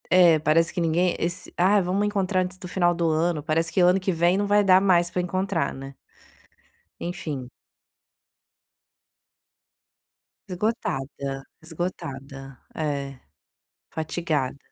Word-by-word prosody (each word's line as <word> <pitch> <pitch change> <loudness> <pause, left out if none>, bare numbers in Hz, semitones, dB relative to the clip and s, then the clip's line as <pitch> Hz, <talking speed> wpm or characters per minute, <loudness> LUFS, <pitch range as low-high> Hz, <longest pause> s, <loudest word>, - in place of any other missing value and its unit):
É, 175 -3 +6
parece 160 +2 +2
que 175 - -2
ninguém 170 +2 +1
esse 175 +2 -3
"Ah, 195 +4 +4
vamos 190 +3 0
encontrar 195 -2 0
antes 185 0 -4
do 185 - -9
final 175 -1 +2
do 170 -1 +1
ano", 160 0 +1
parece 165 +2 0
que - - 0
ano 180 +2 +5
que 190 0 -1
vem 175 +2 +2
não 205 0 0
vai 205 0 +4
dar 190 -1 +6
mais 175 -3 +3
para 180 - -1
encontrar, 185 0 -1
né. 135 +1 -9 1.1
Enfim. 150 -7 -5 3.0
Esgotada, 140 - -3 0.2
esgotada. 140 -5 -6 0.2
É, 140 -3 -3 0.7
fatigada. 155 -4 -2
175 Hz, 120 wpm, -25 LUFS, 155-185 Hz, 3.0 s, É